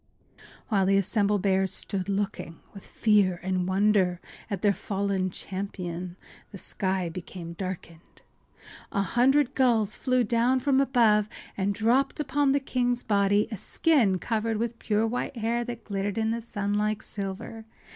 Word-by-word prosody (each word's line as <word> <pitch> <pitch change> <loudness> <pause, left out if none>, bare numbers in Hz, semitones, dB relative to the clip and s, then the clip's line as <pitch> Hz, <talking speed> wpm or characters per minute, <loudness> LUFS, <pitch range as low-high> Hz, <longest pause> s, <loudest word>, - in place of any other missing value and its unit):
While 195 -4 +2
the 195 0 +4
assembled 200 0 +1
bears 190 -1 +2
stood 195 0 -3
looking 195 -4 -3
with 195 - -11
fear 200 -5 +2
and 185 -1 -1
wonder 190 -2 +2 0.3
at 200 -3 -4
their 205 -1 +4
fallen 195 -2 -1
champion 180 -2 -5 0.4
the 200 - -8
sky 190 -1 -2
became 170 0 -7
darkened. 170 -2 -8 0.7
An 200 - +1
hundred 265 +5 +3
gulls 230 -5 +2
flew 255 -1 +1
down 240 +3 +2
from 270 +1 +3
above 220 -6 +3 0.3
and 200 +1 -1
dripped 245 +8 +2
upon 285 -1 +1
the 280 - +3
king’s 245 -2 -1
body 205 0 +2
a 215 - -4
skin 230 - +2
covered 225 +2 -1
with 235 +1 -3
pure 215 +1 +1
white 245 +2 -3
hair 230 +2 0
that 235 -1 -6
glittered 200 0 -3
in 220 0 +1
the 230 +1 -2
sun 205 -3 -3
like 210 +1 0
silver. 200 +3 -6
205 Hz, 150 wpm, -27 LUFS, 190-235 Hz, 0.7 s, the